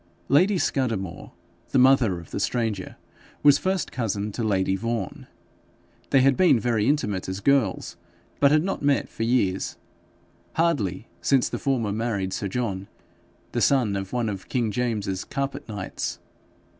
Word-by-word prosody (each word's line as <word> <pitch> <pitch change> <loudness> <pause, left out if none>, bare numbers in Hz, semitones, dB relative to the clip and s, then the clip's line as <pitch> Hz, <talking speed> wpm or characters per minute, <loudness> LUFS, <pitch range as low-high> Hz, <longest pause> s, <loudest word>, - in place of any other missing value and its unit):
Lady 185 +8 +4
Scudamore, 115 - -2 0.4
the - - +1
mother 125 -8 +4
of 85 - -13
the - - -3
stranger, 110 -6 -2 0.5
was 145 -1 +7
first 190 -1 -1
cousin 105 -3 -2
to 115 - -4
lady 95 -3 +1
Vaughan. 115 -1 -4 0.8
They 135 - +5
had 135 0 +4
been 175 -8 +5
very 110 -1 +1
intimate 105 -11 0
as 95 +1 -3
girls, 130 -4 +1 0.4
but 140 - +6
had 155 +2 +4
not 195 +1 -2
met 140 -1 +1
for - - -9
years 115 -5 +1 0.8
hardly 120 - 0
since 135 -3 +3
the - - -4
former 125 -7 0
married 100 -3 -2
sir 100 - -2
John, 100 -3 -3 0.6
the - - -1
son 125 -8 +3
of 95 -1 -4
one 120 -2 0
of 95 -3 -5
King 120 -4 0
James's 105 -5 -1
carpet 140 -3 -4
knights. 105 -3 -4
115 Hz, 150 wpm, -25 LUFS, 100-135 Hz, 0.8 s, was